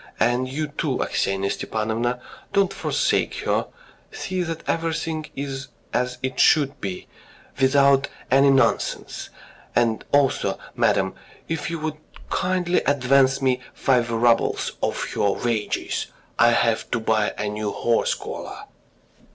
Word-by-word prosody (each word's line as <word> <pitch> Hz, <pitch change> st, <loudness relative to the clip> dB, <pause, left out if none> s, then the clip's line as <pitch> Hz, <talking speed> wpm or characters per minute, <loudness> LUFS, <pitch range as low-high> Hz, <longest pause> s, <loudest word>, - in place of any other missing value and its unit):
And 125 Hz, +2 st, +2 dB
you, 150 Hz, +4 st, -2 dB
too, 145 Hz, -2 st, -2 dB
Aksinya 95 Hz, 0 st, 0 dB
Stepanovna, 115 Hz, +3 st, -2 dB, 0.3 s
do 200 Hz, -, +5 dB
not 195 Hz, -, 0 dB
forsake -, -, 0 dB
her, -, -, 0 dB, 0.4 s
see 185 Hz, -1 st, -3 dB
that 165 Hz, -2 st, -4 dB
everything 160 Hz, -1 st, -1 dB
is 135 Hz, -1 st, -4 dB, 0.3 s
as 125 Hz, 0 st, 0 dB
it 130 Hz, 0 st, -2 dB
should 145 Hz, -2 st, +4 dB
be... 95 Hz, -2 st, -5 dB, 0.5 s
without 140 Hz, 0 st, +5 dB, 0.2 s
any 135 Hz, +1 st, +6 dB
nonsense.... 135 Hz, -1 st, +1 dB, 0.5 s
And 115 Hz, -2 st, +2 dB
also, 140 Hz, -2 st, +2 dB, 0.2 s
madam, -, -, +2 dB, 0.3 s
if 165 Hz, -1 st, -2 dB
you 165 Hz, -, -3 dB
would 155 Hz, -1 st, -3 dB, 0.3 s
kindly 180 Hz, -1 st, +1 dB
advance 135 Hz, 0 st, +3 dB
me 130 Hz, -1 st, +2 dB, 0.2 s
five 125 Hz, -3 st, +2 dB
roubles 115 Hz, 0 st, +2 dB
of -, -, -1 dB
her 100 Hz, -1 st, +2 dB
wages. 115 Hz, -3 st, -2 dB, 0.3 s
I -, -, +7 dB
have -, -, +2 dB
got -, -, -32 dB
to 120 Hz, -, +1 dB
buy 110 Hz, -1 st, +1 dB
a 105 Hz, -, -2 dB
new 105 Hz, 0 st, -2 dB
horse 120 Hz, -1 st, +1 dB
collar." -, -, -7 dB
135 Hz, 135 wpm, -23 LUFS, 115-150 Hz, 0.5 s, I